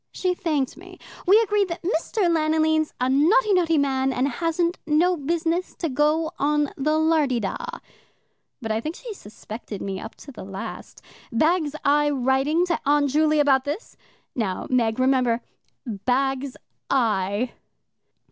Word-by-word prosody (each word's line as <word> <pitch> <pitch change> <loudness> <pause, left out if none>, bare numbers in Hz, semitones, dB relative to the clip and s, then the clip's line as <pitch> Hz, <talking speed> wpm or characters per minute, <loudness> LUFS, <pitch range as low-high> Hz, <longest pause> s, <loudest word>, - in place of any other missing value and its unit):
She 365 -1 -1
thanked 305 -8 -1
me. 365 +2 -13 0.3
We 405 +4 +7
agreed 415 -2 +1
that 335 0 -6
Mr. 375 +4 -1
Lanoline's 315 -1 +2
a 250 - +1
notty, 370 - +4
notty 335 -3 +3
man, 270 -2 +1
and 255 +1 0
hasn't 335 +5 -1
no 335 +4 +3
business 335 +3 -1
to 330 - -3
go 305 +4 +1
on 295 0 +1
the 305 +3 +1
lardy 315 -6 +2
da. 195 -4 -2 1.1
But 225 - -2
I 220 +1 0
think 310 +7 -4
she 475 -3 -8
suspected 215 - -9
me 195 -1 -4
up 220 - -9
to 280 - -12
the 215 - -9
last. 195 0 -8 0.3
Bags 310 +4 +1
I 295 +1 +4
writing 275 +5 +1
to 345 -2 -1
Aunt 285 -1 +2
Juley 305 +1 +3
about 275 -3 +4
this. 295 - -5 0.4
Now, 200 -6 -2
Meg, 230 -3 +2
remember 255 -2 +2 0.4
bags 260 +5 -1 0.3
I." 220 -2 +1
295 Hz, 145 wpm, -24 LUFS, 255-330 Hz, 1.1 s, We